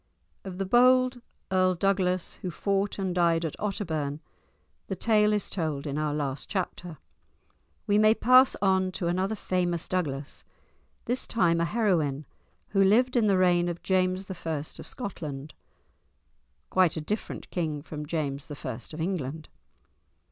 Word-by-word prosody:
Of 190 -2 -7
the 195 - -1
bold 255 +3 +4 0.3
Earl 185 -1 +3
Douglas 185 -1 0
who 185 - -3
fought 195 +3 -1
and 190 -2 -2
died 170 -2 +2
at 155 - -4
Otterbourne 160 -8 -2 0.7
the - - -3
tale 210 -2 +3
is 210 -1 0
told 155 -6 -3
in 145 0 -2
our 155 -1 0
last 145 -2 -3
chapter. 180 -4 -4 0.9
We 205 +1 +3
may 215 +1 +5
pass 255 +3 +6
on 190 -1 +2
to 180 - -3
another 185 +5 0
famous 175 -4 -1
Douglas, 145 -6 -3 0.6
this 245 +2 -1
time 170 -6 +2
a - - +2
heroine, 165 -9 0 0.4
who 195 -1 +3
lived 245 +6 +3
in 230 -3 +3
the 195 -2 +3
reign 175 -1 +3
of 170 0 -6
James 185 0 +1
I. 190 - -4 0.5
of - - -7
Scotland 155 - -6 1.2
(quite 185 -4 +3
a - - -2
different 210 +7 -5
king 155 -5 -2
from 150 -2 -7
James 145 -3 -3
I. 145 -3 -5
of 155 - -7
England). 160 -4 -3
180 Hz, 150 wpm, -27 LUFS, 155-200 Hz, 1.2 s, pass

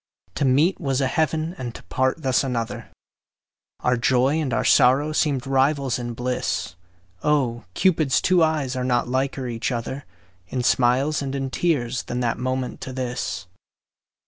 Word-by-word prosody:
To 140 - 0
meet 145 +8 +3
was 135 -4 0
a 135 - +2
heaven 160 +3 0
and 120 -2 -5
to - - -10
part 130 +5 -1
thus 130 0 +2
another, 120 -4 -3 0.9
Our 125 0 +2
joy 125 +3 +2
and 140 -5 -2
our - - 0
sorrow 135 +5 +4
seemed 145 -4 0
rivals 135 -1 +1
in 120 -1 -5
bliss; 125 -6 -2 0.5
Oh! 125 -6 0
Cupid's 155 -8 +3
two 185 -2 +3
eyes 155 -5 +1
are 130 - -2
not 120 -1 +1
liker 130 +1 -1
each 115 +1 -2
other 125 +3 -4 0.4
In 125 +5 -3
smiles 130 +5 +2
and 135 0 -3
in 135 -1 -3
tears 130 -7 0
than 120 - -4
that 120 -1 -1
moment 130 0 -3
to 130 - -6
this. 125 -4 -3
130 Hz, 160 wpm, -23 LUFS, 125-145 Hz, 0.9 s, sorrow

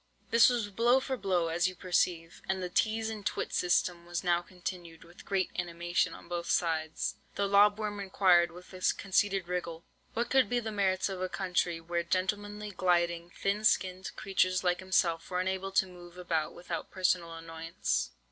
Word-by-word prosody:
"This 230 +1 +7
was 235 -4 -1
blow 240 +5 +4
for 265 0 -3
blow, 185 -7 0
as 170 +2 +2
you 185 - -5
perceive; 170 -2 0
and 190 -1 0
the 180 - -3
teaze 220 +3 +1
and 220 -2 -5
twit - - -2
system 175 -1 +1
was 175 0 -4
now 175 -1 +2
continued 175 -2 -7
with 170 +2 -15
great 195 -2 0
animation 175 0 -1
on - - -13
both 170 0 -4
sides. 160 -2 0 0.2
"The 200 - +1
lob 205 +1 +5
worm 210 -1 -3
inquired, 185 -3 +4
with 180 +2 -13
a 185 - -9 0.2
conceited 195 -1 +1
wriggle, 170 -2 -4 0.3
what 235 +1 -1
could 260 -5 +4
be 245 - +1
the 225 -2 -4
merits 190 -2 +1
of 190 -2 -5
a 185 - -1
country, 180 -3 -1
where 170 +1 -2
gentlemanly, 205 +4 -2
gliding, 170 -2 +1
thin 200 +4 -2
skinned 185 -3 +1
creatures 185 -1 +1
like 180 -1 +1
himself 180 -3 +1
were 180 - -1
unable 190 +1 -2
to 190 - +4
move 175 -1 -13
about 165 -3 -2
without 175 - -5
personal 180 -3 0
annoyance? 165 0 -2
185 Hz, 180 wpm, -31 LUFS, 175-200 Hz, 0.3 s, This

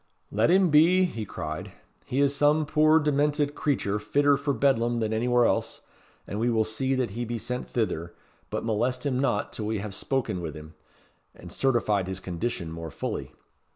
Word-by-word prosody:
"Let 110 +6 +2
him 185 -1 +4
be," 170 +5 +5
he 115 -11 -4
cried. 85 +4 -6 0.3
"He 135 +3 0
is 140 0 +2
some 150 +2 +3
puir 155 +1 +4
demented 145 -1 +1
creature 105 -10 -1
fitter 140 +7 +3
for 140 +1 -1
Bedlam 120 -4 +2
than 110 -1 -1
anywhere 120 +2 +3
else; - - -1 0.4
and 100 - -5
we 120 +2 +1
will 110 -2 +2
see 130 +5 -1
that 125 -5 -1
he 120 +4 -4
be 120 0 -3
sent 125 +3 -5
thither; 85 -7 -2 0.3
but - - -3
molest 125 +4 -1
him 130 -3 0
not 120 -6 0
till 105 - -4
we 110 0 -1
hae 100 +1 -5
spoken 120 -3 -2
wi' 80 -3 -5
him, 80 +1 -11 0.6
and - - -11
certified 110 -7 +1
his 95 0 -4
condition 90 -1 -4
more 80 0 -6
fully. - - -5
120 Hz, 185 wpm, -27 LUFS, 105-140 Hz, 0.6 s, be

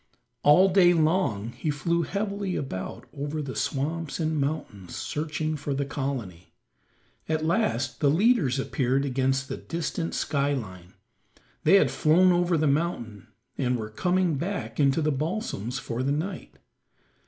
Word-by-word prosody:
All 165 +6 +6
day 180 -2 +5
long 155 - +1
he 155 - -4
flew 170 +4 0
heavily 200 +1 -2
about 95 -10 -5
over 145 +2 -3
the 140 -3 -4
swamps 155 +3 -2
and 155 -2 0
mountains 125 - -4
searching 155 +1 -2
for 145 -1 -3
the 140 +1 -1
colony. 130 - -5 0.7
At 155 0 0
last 160 - 0
the 145 - +3
leaders 170 - +3
appeared 135 0 0
against 135 0 0
the - - -4
distant 165 0 -3
sky 145 0 0
line; 95 -7 -8 0.7
they 170 +6 +7
had 195 - +5
flown 180 +4 +4
over 175 -1 +2
the 155 - +1
mountain, 140 - -1 0.3
and 125 -2 +1
were 110 -1 -6
coming 180 - +1
back 190 +4 -4
into 145 +2 +3
the 155 - +2
balsams 140 - -3
for 120 0 -4
the 135 +2 0
night. 175 +6 -4
150 Hz, 145 wpm, -26 LUFS, 135-170 Hz, 0.7 s, they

